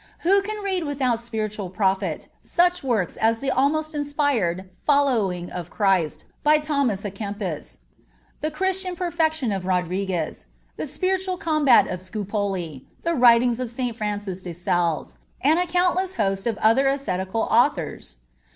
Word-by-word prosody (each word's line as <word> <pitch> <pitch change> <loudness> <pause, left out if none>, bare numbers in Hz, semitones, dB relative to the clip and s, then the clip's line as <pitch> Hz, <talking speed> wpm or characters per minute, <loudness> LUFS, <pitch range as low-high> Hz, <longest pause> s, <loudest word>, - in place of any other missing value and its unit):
Who 395 +4 +4
can 420 +1 -5
read 380 -3 -1
without 265 -5 0
spiritual 215 -4 -4
profit 190 -3 0
such 355 -1 +2
works 220 -9 0
as 225 +1 +2
the 275 +1 -1
almost 310 +4 +1
inspired 285 - 0 0.2
Following 225 - +2
of 175 -1 -6
Christ 190 -7 +1 0.2
by 300 +1 +5
Thomas 280 -9 0
à 205 -2 -4
Kempis; 200 -5 -5 0.6
the 310 - 0
Christian 375 +3 -1
Perfection 320 - 0
of 190 -2 -3
Rodriguez; 180 -2 -1 0.3
the - - -4
Spiritual 375 0 -1
Combat 305 -5 +4
of 180 - -4
Scupoli; 190 - -3 0.2
the 335 - +1
writings 240 -2 +5
of 250 -2 -3
St. 245 -1 -3
Francis 205 -4 -3
de 180 -2 -6
Sales, 175 -2 -1 0.2
and 310 +5 +3
a 360 - 0
countless 360 +1 +1
host 195 -1 0
of 225 -3 -1
other 235 +5 +4
ascetical 225 -7 -1
authors? - - +1
235 Hz, 140 wpm, -24 LUFS, 190-305 Hz, 0.6 s, by